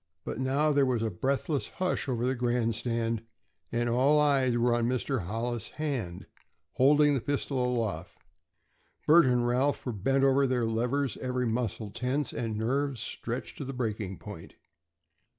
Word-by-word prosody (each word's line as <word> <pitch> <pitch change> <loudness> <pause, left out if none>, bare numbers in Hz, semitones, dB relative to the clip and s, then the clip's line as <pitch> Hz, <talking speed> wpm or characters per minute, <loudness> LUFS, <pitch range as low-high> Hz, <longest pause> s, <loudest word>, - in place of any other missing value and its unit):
But - - -5
now 140 +4 +2
there 140 -1 +3
was 120 -3 0
a 110 - -1
breathless 135 - -1
hush 185 -4 -2
over 120 -1 0
the 130 - +1
grandstand, 115 -2 0 0.5
and 120 0 0
all 130 +6 +4
eyes 135 -4 +3
were 120 0 +3
on 120 -1 +1
Mr. 130 -4 -1
Hollis's 115 +2 -3
hand, 125 - -3 0.5
holding 145 +6 +4
the 135 - 0
pistol 140 -1 -1
aloft. 115 -9 -2 0.9
Bert 160 -1 +7
and 125 -1 +2
Ralph 130 +4 +1
were 125 - -1
bent 135 +7 +1
over 135 0 +4
their 125 -2 +1
levers, 120 +4 0
every 125 -1 -2
muscle 115 -2 -2
tense, 125 +5 -1
and 115 -3 -3
nerves 135 +3 -1
stretched 115 +2 -5
to - - -3
the 135 0 -5
breaking 110 -6 -3
point. - - -10
125 Hz, 155 wpm, -29 LUFS, 115-135 Hz, 0.9 s, Bert